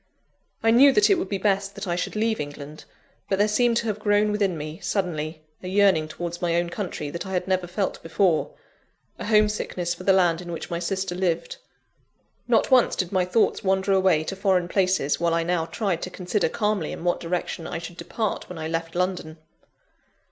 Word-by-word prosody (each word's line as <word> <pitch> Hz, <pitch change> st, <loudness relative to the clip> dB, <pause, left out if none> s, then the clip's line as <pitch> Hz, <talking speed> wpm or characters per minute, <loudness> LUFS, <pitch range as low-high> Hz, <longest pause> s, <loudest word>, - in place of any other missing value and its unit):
I 225 Hz, -, +5 dB
knew 270 Hz, +5 st, +7 dB
that 415 Hz, -1 st, +4 dB
it 380 Hz, -, +4 dB
would 360 Hz, -, -3 dB
be 200 Hz, -, -1 dB
best 195 Hz, 0 st, 0 dB
that 200 Hz, -, -6 dB
I 175 Hz, -, 0 dB
should 180 Hz, -, -3 dB
leave 220 Hz, +1 st, 0 dB
England; 145 Hz, +1 st, -7 dB, 0.4 s
but 195 Hz, -, +1 dB
there 205 Hz, +2 st, +3 dB
seemed 235 Hz, +2 st, +2 dB
to 230 Hz, -, -1 dB
have 215 Hz, -2 st, -2 dB
grown 210 Hz, 0 st, +2 dB
within 200 Hz, -4 st, 0 dB
me, 155 Hz, +1 st, -6 dB
suddenly, 155 Hz, -5 st, -2 dB, 0.2 s
a 180 Hz, -, -7 dB
yearning 190 Hz, -5 st, +3 dB
towards 170 Hz, +2 st, -6 dB
my 170 Hz, -1 st, +1 dB
own 170 Hz, 0 st, 0 dB
country 170 Hz, -7 st, -4 dB
that 170 Hz, -, -5 dB
I 190 Hz, -, -5 dB
had 180 Hz, -, -1 dB
never 185 Hz, -1 st, 0 dB
felt 190 Hz, +2 st, -2 dB
before 165 Hz, 0 st, +1 dB, 0.7 s
a -, -, -5 dB
home 215 Hz, -1 st, +5 dB
sickness 180 Hz, -4 st, -3 dB
for -, -, -10 dB
the 195 Hz, -, +4 dB
land 175 Hz, -3 st, +3 dB
in 175 Hz, -1 st, -7 dB
which 165 Hz, -, -6 dB
my 170 Hz, -, -1 dB
sister 190 Hz, +1 st, -2 dB
lived. 175 Hz, -2 st, -1 dB, 0.9 s
Not -, -, +2 dB
once 255 Hz, -2 st, +5 dB
did 180 Hz, -2 st, -2 dB
my 185 Hz, -1 st, +2 dB
thoughts 215 Hz, +5 st, +1 dB
wander 190 Hz, 0 st, +1 dB
away 185 Hz, -5 st, +3 dB
to 195 Hz, -, -4 dB
foreign 190 Hz, -3 st, +1 dB
places, 185 Hz, -6 st, +1 dB
while 170 Hz, 0 st, +1 dB
I 165 Hz, -, +1 dB
now 165 Hz, -1 st, 0 dB
tried 190 Hz, -6 st, -2 dB
to -, -, -4 dB
consider 180 Hz, +1 st, -1 dB
calmly 210 Hz, -6 st, -1 dB
in -, -, -7 dB
what 175 Hz, 0 st, +1 dB
direction 170 Hz, -1 st, -3 dB
I -, -, -4 dB
should 170 Hz, +1 st, -8 dB
depart 220 Hz, +2 st, -3 dB
when 180 Hz, -, -7 dB
I 160 Hz, 0 st, -4 dB
left 165 Hz, +1 st, -3 dB
London. 180 Hz, -3 st, -2 dB
180 Hz, 210 wpm, -24 LUFS, 170-200 Hz, 0.9 s, knew